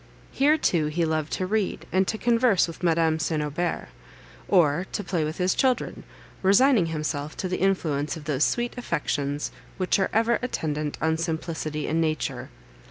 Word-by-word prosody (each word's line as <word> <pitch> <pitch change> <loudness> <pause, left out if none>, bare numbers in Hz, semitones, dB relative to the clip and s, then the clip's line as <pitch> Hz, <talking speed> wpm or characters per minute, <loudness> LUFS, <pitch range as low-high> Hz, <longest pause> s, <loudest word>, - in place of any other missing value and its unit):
Here, 295 +3 +3
too, 165 - +1
he 165 +3 0
loved 155 -1 -1
to 185 - -1
read, 205 0 -1
and 190 0 +2
to 220 - -1
converse 230 -5 +3
with 165 - -9
Madame 165 -2 +2
St. 160 -1 -1
Aubert; 150 - -2 0.6
or 175 -1 +3
to 205 - -2
play 175 -3 -1
with 155 +1 -3
his 185 0 +2
children, 260 -2 0 0.4
resigning 200 0 +5
himself 155 -2 -3
to 185 - -2
the 185 - -2
influence 160 -6 0
of 155 - -9
those 150 -2 0
sweet 240 0 0
affections, 145 - -2 0.3
which 185 +2 +1
are 195 - +1
ever 230 +2 +2
attendant 150 -11 -2
on 160 0 +2
simplicity 160 -2 -3
and 165 +1 +1
nature. 155 -1 -2
165 Hz, 165 wpm, -25 LUFS, 155-195 Hz, 0.6 s, resigning